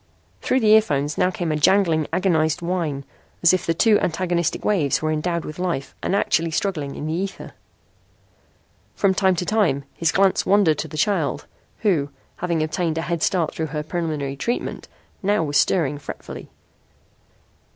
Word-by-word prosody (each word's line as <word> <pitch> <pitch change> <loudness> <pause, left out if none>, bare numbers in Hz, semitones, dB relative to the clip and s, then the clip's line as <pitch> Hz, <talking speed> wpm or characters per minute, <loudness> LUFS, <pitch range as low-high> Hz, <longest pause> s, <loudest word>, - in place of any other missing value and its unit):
Through 260 - +1
the 215 - +3
earphones 150 -10 +3
now 180 - +2
came 175 -3 -3
a - - 0
jangling, 160 -1 +3
agonized 165 -2 +1
whine, 165 -6 -2 0.4
as 170 - +6
if 185 - 0
the 165 - +1
two 215 +4 +4
antagonistic 175 -1 -1
waves 170 -10 +2
were 155 0 -1
endowed 170 +2 -1
with 155 +2 -8
life 170 -7 -2
and 195 - 0
actually 165 -4 +1
struggling 155 -5 -2
in - - -5
the 155 - -2
ether. 190 +3 -4 1.4
From 195 -2 +2
time 190 -1 +2
to 180 - -2
time 195 -11 +1
his 165 -2 0
glance 195 +2 +3
wandered 195 -7 +3
to - - -3
the 155 - -8
child, 170 -3 0 0.4
who, 165 -10 +1 0.3
having 170 -3 -1
obtained 160 +1 -1
a 165 - -1
head 170 -2 -2
start 170 -3 +1
through 160 - -3
her 150 +1 -4
preliminary 155 -4 -3
treatment, 235 - -3 0.3
now 200 -3 +1
was 145 -2 0
stirring 145 -5 +2
fretfully. - - -9
165 Hz, 165 wpm, -22 LUFS, 155-190 Hz, 1.4 s, as